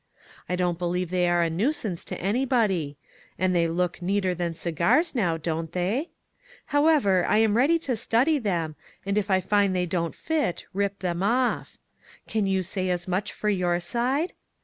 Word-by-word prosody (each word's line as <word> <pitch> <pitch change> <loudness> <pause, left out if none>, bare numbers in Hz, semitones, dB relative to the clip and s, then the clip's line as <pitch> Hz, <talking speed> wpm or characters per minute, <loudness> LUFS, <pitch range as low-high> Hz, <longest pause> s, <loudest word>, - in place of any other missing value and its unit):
I 180 - +1
don't 175 -2 -1
believe 180 0 -1
they 180 -1 +2
are 175 0 +3
a 165 - +1
nuisance 205 - -1
to - - -5
anybody; 200 - 0 0.4
and 185 -1 +1
they 170 -1 +3
look 175 +1 -1
neater 190 0 0
than 170 -1 -3
cigars, 170 - +1
now, 180 -10 +1
don't 160 0 -3
they? 205 - -1 0.6
However, 290 - +3
I - - +3
am 220 -1 +3
ready 280 +8 +4
to 255 - 0
study 255 +8 +2
them, 170 - -2 0.3
and 200 0 -1
if 210 -1 0
I 190 -1 +3
find 200 0 +2
they 180 -1 +1
don't 170 -1 -2
fit, 305 - -1
rip 200 0 -1
them 175 -1 -2
off. 240 +5 0 0.5
Can 215 -3 0
you 190 -1 +1
say 185 +1 -2
as 175 0 -2
much 185 +2 -1
for 210 - -2
your 175 -3 +1
side 250 - -1
185 Hz, 175 wpm, -26 LUFS, 175-225 Hz, 0.6 s, ready